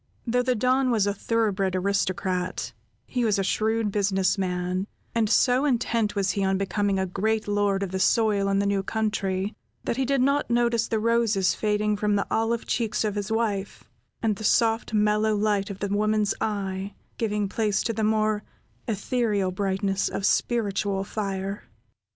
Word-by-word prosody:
Though 245 +1 +2
the 250 0 +1
Don 255 +3 +2
was 220 -5 +2
a 205 - +1
thorough 225 +1 0
bred 190 -1 -1
aristocrat, 185 -1 -1 0.3
he 250 -2 -2
was 215 -3 +2
a 195 - +1
shrewd 220 +2 0
business 195 -2 +1
man, 185 0 -2 0.3
and 225 -2 +1
so 250 +3 +3
intent 230 -6 0
was 195 -1 +1
he 200 - -1
on 190 0 +2
becoming 200 0 0
a 190 - +1
great 215 +4 -1
lord 205 -1 +1
of 190 - -4
the 190 - -2
soil 205 0 +2
in 195 - +2
the 200 - +1
new 200 -1 +1
country, 200 -2 -1 0.3
that 235 - -2
he 265 - +1
did 275 +1 +1
not 280 +1 +1
notice 235 -1 +2
the 225 - 0
roses 225 -4 +2
fading 210 0 0
from 210 0 +1
the 200 - +1
olive 225 +1 0
cheeks 225 -3 -1
of 210 -2 -1
his 205 +1 -4
wife, 210 -3 -1 0.4
and 215 -3 +1
the 220 - -7
soft 225 +1 +2
mellow 210 0 +2
light 205 -1 0
of 200 - -6
the 200 - -2
woman's 210 +1 +1
eye 195 -2 -3 0.2
giving 210 -2 0
place 210 0 0
to 230 - -1
the 220 0 -2
more 215 -1 +1 0.5
ethereal 210 -3 0
brightness 195 0 -1
of 195 - -3
spiritual 200 -5 0
fire. 195 -1 -4
210 Hz, 175 wpm, -25 LUFS, 195-225 Hz, 0.5 s, so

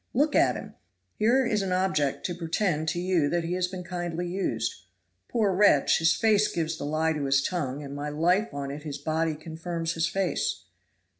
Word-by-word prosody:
Look 295 +4 +2
at - - +4
him! - - -8 0.4
here 245 +5 +3
is 210 -3 +1
an 195 -1 -2
object 180 -7 0
to 175 - -1
pretend 165 -1 -1
to 175 - 0
you 175 -5 +1
that 170 +1 0
he 170 +2 -2
has 180 0 0
been 180 0 -7
kindly 175 -1 -3
used. 190 +2 -3 0.4
Poor 215 -5 +1
wretch, 185 -7 +4
his 165 +1 +4
face 215 -2 +3
gives 160 -1 -1
the - - -5
lie 155 +2 +1
to 150 -2 -2
his 135 0 +3
tongue, 145 -5 -2
and 140 0 -7
my 145 +1 -4
life 175 +8 +1
on 140 -1 -4
it 145 +2 -6
his 145 -2 -5
body 160 +2 -1
confirms 165 +1 -4
his 165 0 0
face. 185 -2 -1
170 Hz, 200 wpm, -27 LUFS, 150-185 Hz, 0.4 s, at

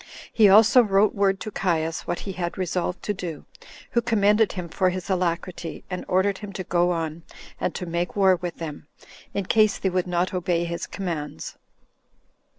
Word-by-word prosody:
He 215 -3 +6
also 220 +5 +7
wrote 205 -1 +3
word 195 -1 +1
to 215 - -5
Caius 165 -4 -1
what 175 - -2
he 195 - -5
had 175 -2 -4
resolved 180 0 -2
to 210 - -1
do, 170 -5 -6 0.5
who 235 - +2
commended 215 -2 +3
him 180 -3 -5
for 185 +3 +1
his 185 +1 -4
alacrity, 175 -2 -2
and 180 - -4
ordered 190 +1 +1
him 205 -1 -7
to 185 - -4
go 175 0 +2
on, 165 -1 -2 0.4
and - - -2
to 180 - -4
make 170 +1 -2
war 190 -2 +5
with 175 -1 -5
them, 150 -3 -7 0.5
in 200 - -1
case 215 +1 +3
they 190 - -1
would 185 0 0
not 180 +1 0
obey 175 -2 0
his 170 0 -4
commands. 155 - -5
185 Hz, 180 wpm, -24 LUFS, 170-200 Hz, 0.5 s, also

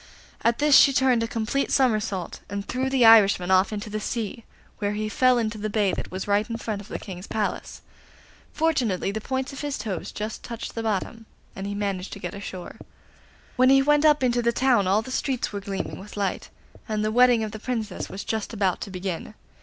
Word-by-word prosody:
At 230 0 +3
this 295 -1 +4
she 275 - +7
turned 255 -3 +3
a 230 - 0
complete 230 +4 -1
somersault, 215 -8 0
and 200 0 -5
threw 260 +1 -1
the 265 -3 +3
Irishman 200 -5 +6
off 190 +2 +4
into 210 0 -4
the 215 0 -3
sea, 230 0 -4 0.3
where 205 -1 -1
he 215 +1 -2
fell 255 +3 +3
into 220 -2 -2
the 215 +1 -2
bay 205 -3 +1
that - - -4
was 185 +2 -5
right 205 +3 +1
in 230 - -3
front 215 -3 -4
of 205 - -13
the - - -5
King's 185 -1 -9
Palace. 215 -1 -3 0.7
Fortunately 260 - 0
the 220 +2 -4
points 265 +3 -3
of 275 - -7
his 290 -2 -3
toes 195 -7 -4
just 215 +1 -5
touched 235 -1 -7
the 230 - -3
bottom, 225 +1 -3 0.3
and 195 +1 -5
he 200 - -4
managed 200 -2 -3
to - - -8
get - - -5
ashore. 190 -3 -8 0.8
When 255 +1 +5
he 270 0 +6
went 295 +1 +3
up 300 -3 +4
into 245 -1 +2
the 235 0 +2
town 235 -5 +2
all 205 +4 +2
the 260 - -8
streets 255 -3 -2
were 200 - -4
gleaming 195 -1 -4
with 205 +2 -11
light, 200 -2 -2 0.4
and 215 0 0
the 215 - 0
wedding 245 -1 +5
of 215 - -4
the 215 - -7
Princess 220 -4 -4
was 195 - -6
just 220 0 -3
about 195 -4 0
to - - -5
begin. 185 +2 -5
215 Hz, 215 wpm, -25 LUFS, 200-250 Hz, 0.8 s, she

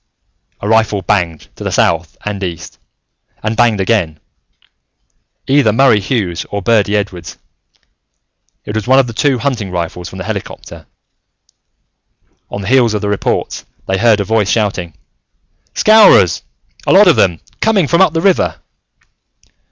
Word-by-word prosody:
A 100 - -4
rifle 110 -3 +1
banged 85 -4 -1
to - - -8
the - - -3
south 85 0 0
and 105 -2 -4
east, 85 -4 -6 0.6
and 110 +1 -2
banged 115 -3 +2
again. 95 -6 0 1.3
Either 135 -5 +3
Murray 115 -1 +4
Hughes 100 -5 -2
or 100 -1 -4
Birdy 105 -2 +2
Edwards: 95 -4 -5 1.3
it 105 - -6
was 110 0 -3
one 130 +1 +4
of 135 - +4
the 115 - -7
two 135 +3 +1
hunting 120 -6 -3
rifles 90 0 -5
from - - -11
the - - -6
helicopter. - - -7 1.6
On 100 - -6
the - - -6
heels 120 -2 +3
of 105 - -2
the 105 - -2
reports, 105 - -2 0.2
they 95 0 -1
heard 115 -2 +3
a - - 0
voice 105 -1 0
shouting, 95 -7 -1 0.8
"Scowrers! 215 - +5 0.5
A - - +3
lot - - +6
of - - +5
them, 85 -4 +1 0.2
coming 205 -8 +2
from 170 +4 +2
up 190 - +4
the 165 - -1
river!" 190 0 +1
105 Hz, 150 wpm, -14 LUFS, 95-120 Hz, 1.6 s, lot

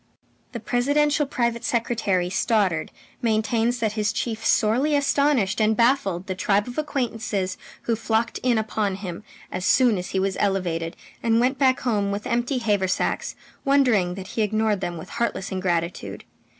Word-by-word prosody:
The 235 - -4
presidential 285 +6 +1
private 235 -2 -1
secretary, 220 -7 0
Stoddard, 190 -6 +1 0.3
maintains 230 +1 +1
that 220 -3 0
his 210 -1 0
chief 225 -2 -3
sorely 255 +10 +2
astonished 280 -7 +2
and 215 0 +3
baffled 215 -8 +2
the 190 - -3
tribe 200 +3 +1
of 245 +4 -4
acquaintances 225 -10 -2 0.3
who 230 - 0
flocked 225 +1 -1
in 245 -2 +2
upon 215 -2 -1
him 190 -1 -7 0.3
as 185 - -4
soon 235 -1 +4
as 180 - -6
he 190 - -1
was 195 0 -1
elevated 175 -4 -1 0.3
and 230 0 +2
went 255 +2 +1
back 260 -2 +3
home, 210 -5 0
with 200 +1 -4
empty 240 +3 0
haversacks, 205 -5 0 0.3
wondering 245 - +3
that 190 0 -8
he 225 - -2
ignored 215 -1 +1
them 175 -2 -3
with 160 - -9
heartless 235 -4 -2
ingratitude. 175 -2 -2
220 Hz, 155 wpm, -24 LUFS, 195-245 Hz, 0.3 s, soon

